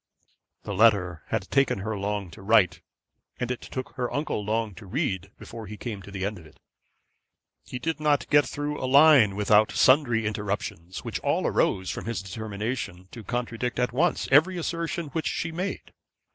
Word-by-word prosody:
The 100 - -4
letter 95 -5 +3
had 110 -4 -3
taken 135 -5 +3
her 110 +2 -3
long 100 -2 -3
to - - -12
write, 95 -5 +3 0.6
and 125 0 -2
it 125 - -4
took 130 -1 -6
her 125 -1 -2
uncle 145 -7 -2
long 110 0 -1
to 95 +2 -12
read, 100 - -2
before 115 -2 -9
he 105 +2 -8
came 105 -2 -5
to 95 - -12
the 100 -1 -4
end 100 -1 -3
of 80 - -14
it. 75 - -21 1.1
He - - -5
did 160 +5 -2
not 145 -4 +1
get 145 -1 +5
through 145 0 -4
a 130 - -1
line 140 -7 +7
without 105 +1 +4
sundry 125 -5 +4
interruptions, 100 -4 -4
which - - -3
all - - 0
arose 95 -1 +1
from - - -6
his 115 -4 -3
determination 100 -1 -5
to 115 - -9
contradict 120 +1 -3
at 125 -1 0
once 160 +6 +1
every 165 +7 +5
assertion 165 -1 -3
which 160 +3 -2
she 165 - -2
made. 180 +4 -5
115 Hz, 180 wpm, -26 LUFS, 100-140 Hz, 1.1 s, line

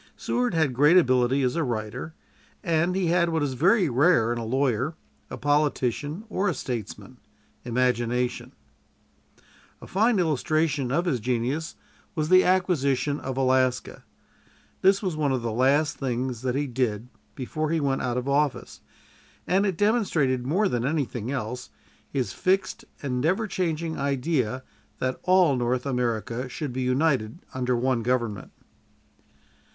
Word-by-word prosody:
Seward 245 -6 -1
had 155 -5 +2
great 150 +8 +5
ability 130 -3 +3
as 125 -1 0
a 165 - +1
writer, 115 +5 -4 0.5
and 170 0 +1
he 190 -1 0
had 170 0 +2
what 160 -2 0
is 140 -2 -1
very 180 - +3
rare 130 -3 +3
in 120 - -4
a - - -4
lawyer, 130 +4 0 0.3
a - - -6
politician, 145 - 0
or 205 -2 0
a 175 - -2
statesman 125 +1 -6 0.5
imagination. 125 0 0 1.3
A - - -11
fine 220 +4 +2
illustration 155 -4 0
of 170 +6 +1
his 145 -9 0
genius 125 +7 -2 0.4
was 155 -1 -1
the 185 0 +7
acquisition 150 -7 +1
of 130 -1 -5
Alaska. 130 -2 +1 0.8
That 195 +2 +4
was 185 -5 -1
one 150 -3 0
of 130 -3 -1
the 115 - -2
last 135 +6 +2
things 125 -2 -2
that 130 -1 -1
he 145 +1 0
did 120 -4 -2 0.3
before 155 +4 -3
he 165 0 +1
went 135 -2 0
out 125 -1 -1
of 125 +1 -3
office, 140 0 -1 0.6
and 195 +3 +2
it 185 -4 -2
demonstrated 165 - +1
more 195 +8 +2
than 120 -8 -1
anything 130 -5 -2
else 125 -2 -4 0.4
his 125 -8 -2
fixed 195 +5 0 0.2
and 125 -3 -1
never 185 - +1
changing 165 -5 -2
idea 130 -3 -1 0.3
that 130 0 -2
all 180 -6 +4
North 125 +1 -1
America 120 -1 -2
should 135 +1 -5
be 130 - -3
united 130 -2 +1 0.2
under 125 -1 0
one 125 0 0
government. 115 -4 -2
135 Hz, 145 wpm, -25 LUFS, 125-165 Hz, 1.3 s, the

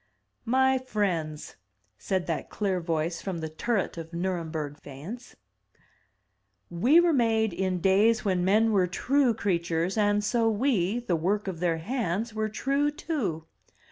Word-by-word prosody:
"My 265 +2 +3
friends, 180 -11 -3 0.4
said 190 -3 -1
that 165 - -3
clear 195 -3 -1
voice 165 0 -2
from 190 -3 -4
the 160 -1 -4
turret 190 +2 -2
of 165 +1 -9
Nurem 175 -1 -2
berg 150 -2 -4
faience. 170 - -9 1.4
"We 245 - +5
were 345 -1 +4
made 225 -5 +2
in 185 0 -1
days 210 +5 +3
when 185 -3 +1
men 215 +4 +3
were 190 -4 +3
true 255 +6 +1
crea 195 -5 0
tures, 170 +4 -1
and 205 0 +2
so 225 +2 +2
we, 215 -3 +1
the 190 -8 0
work 195 +6 -1
of 180 -4 -4
their 170 -2 +1
hands, 220 +2 -2
were 215 0 -1
true 275 +6 0
too. 255 - -3
195 Hz, 150 wpm, -27 LUFS, 170-230 Hz, 1.4 s, We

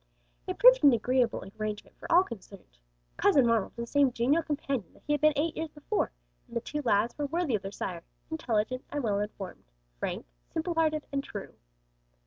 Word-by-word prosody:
It - - -3
proved - - +7
an 280 -3 +8
agreeable 245 +1 +1 0.2
arrangement 215 -1 -4
for - - -7
all 350 +2 +7
concerned. 195 - -11 0.4
"Cousin 270 -4 +5
Ronald" 230 -3 +2
was 235 0 -4
the - - -15
same 285 -2 +4
genial 255 +8 +2
companion 280 - -3
that - - -22
he 295 - +1
had 295 - 0
been 305 0 +6
eight 305 +3 0
years 320 0 -3
before, 300 +8 -2 0.4
and 235 -1 -4
the - - +2
two 295 +5 -4
lads 230 -2 +2
were 290 - 0
worthy 330 -2 0
of 210 - +1
their 195 - -6
sire, 180 -3 -4 0.3
intelligent 255 -4 -1
and 290 -2 -3
well 205 -3 +1
informed, 205 - -6 0.3
frank, - - -3 0.2
simple 335 +2 -2
hearted 310 -2 +1
and 275 0 -1
true. 205 -6 -7
260 Hz, 195 wpm, -29 LUFS, 215-305 Hz, 0.4 s, an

